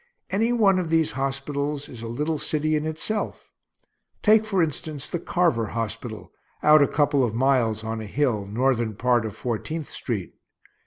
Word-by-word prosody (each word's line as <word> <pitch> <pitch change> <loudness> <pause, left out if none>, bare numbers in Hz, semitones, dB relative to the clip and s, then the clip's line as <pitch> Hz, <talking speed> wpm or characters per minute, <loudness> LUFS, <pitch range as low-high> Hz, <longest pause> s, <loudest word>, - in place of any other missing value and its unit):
Any 225 +5 +2
one 200 -6 +4
of 175 -3 -2
these 165 -1 +2
hospitals 140 +2 -2
is 120 -3 -10
a 115 - -5
little 150 +7 -2
city 155 +1 0
in 155 +1 -1
itself. 180 +7 -3 0.7
Take, 220 0 +5
for 195 -5 +2
instance, 150 -1 -4
the 175 - -3
Carver 165 -11 +1
hospital, 115 0 -5 0.3
out 150 0 +7
a 140 - +5
couple 145 -2 +2
of 115 -3 -1
miles, 120 -4 +2
on 110 0 -3
a 110 - -7
hill, 115 -5 0
northern 120 0 0
part 120 0 +2
of 110 -2 -5
Fourteenth 135 +8 -4
street. 105 -8 -4
140 Hz, 165 wpm, -25 LUFS, 115-160 Hz, 0.7 s, out